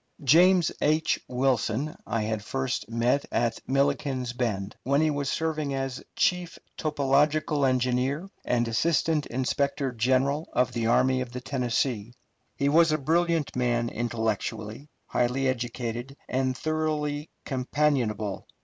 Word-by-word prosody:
James 175 +5 +5
H. 155 +2 +2
Wilson 130 +2 0
I 110 0 -1
had 110 -1 -2
first 130 +2 -2
met 120 +4 +1
at 115 -1 0
Milliken's 135 -2 0
Bend, 105 -5 -2
when 140 +2 +2
he 155 0 +3
was 145 -2 -2
serving 155 -3 -1
as 135 -1 -3
chief 180 -2 +1 0.2
topographical 145 0 +2
engineer 130 +6 0 0.2
and 120 -1 +1
assistant 155 +5 +1
inspector 135 +2 -1
general 130 +6 +1
of 125 0 +2
the 115 -1 -1
Army 130 +2 +3
of 125 -1 -5
the 125 - -5
Tennessee. 120 -3 -1 0.4
He 140 - 0
was 165 +2 +5
a 155 - +2
brilliant 165 +1 +1
man 120 -1 +1
intellectually, 110 +2 -3 0.2
highly 125 +2 0
educated, 120 +1 -3
and 130 0 0
thoroughly 155 -1 -1 0.2
companionable. 125 -7 0
130 Hz, 125 wpm, -27 LUFS, 120-150 Hz, 0.4 s, James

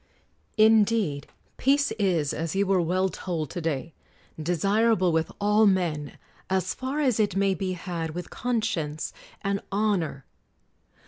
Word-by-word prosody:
Indeed, 215 -8 +3 0.3
peace 280 +1 +2
is, 170 -8 +1
as 165 +3 -3
you 200 +1 +2
were 190 -2 +2
well 185 +3 +1
told 165 -4 -4
to 175 - -4
day, 155 -2 -3 0.5
desirable 185 +4 +2
with 160 0 0
all 210 +1 +4
men, 165 -7 0 0.3
as 190 -1 0
far 265 +3 -3
as 255 -7 +2
it 205 -3 +1
may 195 0 +2
be 185 -1 -2
had 170 -3 -4
with 180 -1 -6
conscience 200 -11 -2 0.3
and 200 0 -1
honor! 195 -9 0
190 Hz, 135 wpm, -26 LUFS, 165-210 Hz, 0.5 s, all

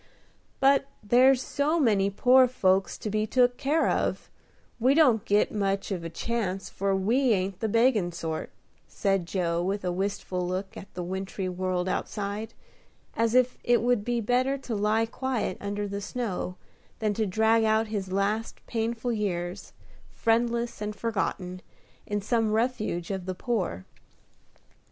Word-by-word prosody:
But 275 0 +4 0.2
there's 255 +4 +5
so 300 +4 0
many 205 -8 +3
poor 255 +5 +5
folks 190 -6 +1
to 215 - -4
be 215 +1 0
took 245 +1 +3
care 305 +4 +1
of, - - -1 0.5
we 255 +4 +4
don't 255 -10 +5
get 205 -1 +2
much 195 -1 -1
of 180 -3 -3
a 165 - -4
chance, 195 0 -3
for 195 0 0
we 235 +6 +2
ain't 190 -1 -2
the 220 - -1
beggin' 230 -5 +3
sort," 165 -2 -4 0.4
said 195 -4 0
Joe, 170 -2 0
with 195 +2 -2
a 180 - 0
wistful 190 0 -2
look 185 +2 -4
at 195 - -10
the 180 - -3
wintry 190 +1 -4
world 185 0 -1
outside, 205 +3 -3 0.6
as 230 +1 +1
if 255 0 +3
it 240 -1 +3
would 245 -3 +2
be 240 +1 0
better 255 +5 +1
to 260 -3 -6
lie 215 +2 +2
quiet 245 -4 -2
under 205 0 -3
the 200 0 -4
snow, 200 -5 -3 0.4
than 215 -2 0
to 215 0 0
drag 220 +3 +3
out 220 0 +3
his 195 -3 -3
last 205 +3 -1
painful 230 +1 -2
years, 180 -4 -3 0.4
friendless 235 0 0
and 210 0 -3
forgotten, 190 -5 -3 0.5
in 205 0 -1
some 225 -1 +1
refuge 215 -7 -1
of 190 -2 -4
the 185 - -2
poor. 180 - -2
210 Hz, 155 wpm, -27 LUFS, 190-235 Hz, 0.6 s, there's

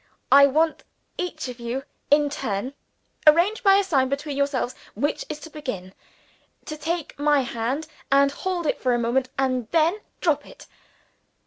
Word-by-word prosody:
I 280 0 +8
want 315 +3 +1 0.4
each 325 -5 -3
of 250 -1 -8
you 240 +3 -3 0.3
in 290 0 +4
turn 250 -1 -3 0.5
(arrange 345 +9 +5
by 390 -4 +6
a 400 - +4
sign 270 -9 +1
between 280 +1 -3
yourselves 280 -3 0 0.2
which 290 +8 -1
is 300 - -5
to 320 - -10
begin) 205 -12 -6 0.7
to 305 - -5
take 320 -1 -4
my 290 -1 +3
hand, 250 +5 -2 0.3
and 275 0 +5
hold 355 +3 -3
it - - -1
for 250 -2 +2
a - - +1
moment, 245 +2 0
and 255 -4 0
then 335 +5 +2 0.2
drop 295 -4 +1
it. - - -14
280 Hz, 160 wpm, -24 LUFS, 255-315 Hz, 0.7 s, I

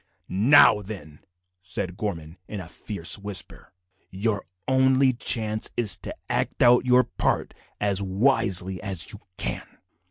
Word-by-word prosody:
"Now, 140 -7 +7
then," 90 -8 -9 0.4
said 90 0 -4
Gorman 85 -5 -6
in 105 - -6
a 90 - -8
fierce 90 0 -2
whisper, 100 -1 -2 0.4
"your 100 +1 -2 0.2
only 130 0 +3
chance 110 -2 +1
is 115 -4 +3
to - - -8
act - - -1
out 125 +1 +5
your 125 0 +5
part 115 - -2 0.3
as 100 -1 0
wisely 95 -3 +1
as 95 -5 -3
you 105 - -10 0.2
can. - - -3
100 Hz, 130 wpm, -24 LUFS, 95-120 Hz, 0.4 s, Now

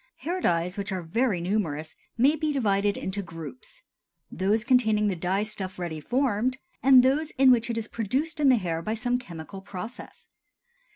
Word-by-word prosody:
Hair 360 +3 -2
dyes, 175 - 0
which 200 +1 -3
are 185 -2 -3
very 210 +3 0
numerous, 165 -5 -2 0.2
may 275 +6 +4
be 310 0 -1
divided 205 -6 +1
into 190 +2 -3
groups—those 170 - -5
containing 220 -5 +3
the 190 - -1
dye 185 +4 0
stuff 210 -3 -5
ready 170 -3 -4
formed, 250 - 0 0.2
and 260 -2 +7
those 290 +4 +2
in 265 -1 +7
which 240 -1 +2
it 230 - -2
is 225 -1 -3
produced 275 - -2
in 285 -2 +5
the 255 - +6
hair 170 -7 -2
by 215 +6 -2
some 245 +2 0
chemical 180 -3 -9
process. 200 +5 -9
210 Hz, 170 wpm, -26 LUFS, 180-255 Hz, 0.2 s, and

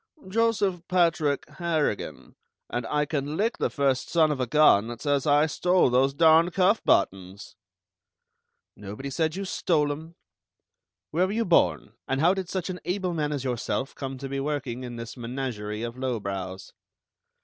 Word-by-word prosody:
"Joseph 205 -3 +1
Patrick 165 -5 +1
Harrigan, 160 - -3 0.4
and 120 -1 -2
I 150 0 +1
can 145 0 -3
lick 225 +4 0
the - - +1
first 135 -3 0
son 160 -2 +3
of 145 - -2
a 125 - -1
gun 120 -7 +5
that 120 -1 -7
says 145 -1 0
I 145 +1 +5
stole 180 -1 +2
those 135 +2 +2
darned 165 +2 +5
cuff 195 +4 +3
buttons!" 95 +1 0 1.2
"Nobody 105 +7 -7
said 160 +2 0
you 195 +1 -4
stole 150 -5 +1
'em. 160 +3 -8 1.0
Where 180 +4 +2
were 195 - -3
you 230 +1 0
born, 85 - +2
and 135 - -1
how 170 +5 +4
did 190 -2 -4
such 185 -3 -3
an 180 - -7
able 185 -1 -2
man 150 -2 -1
as 140 -3 -3
yourself 130 +1 -2
come 135 -1 -6
to 135 +1 -6
be 135 0 -3
working 135 -4 -3
in 120 -1 -6
this 115 -1 -7
menagerie 115 -4 -4
of 120 +2 -6
lowbrows?" 100 -7 -4
145 Hz, 165 wpm, -26 LUFS, 125-170 Hz, 1.2 s, gun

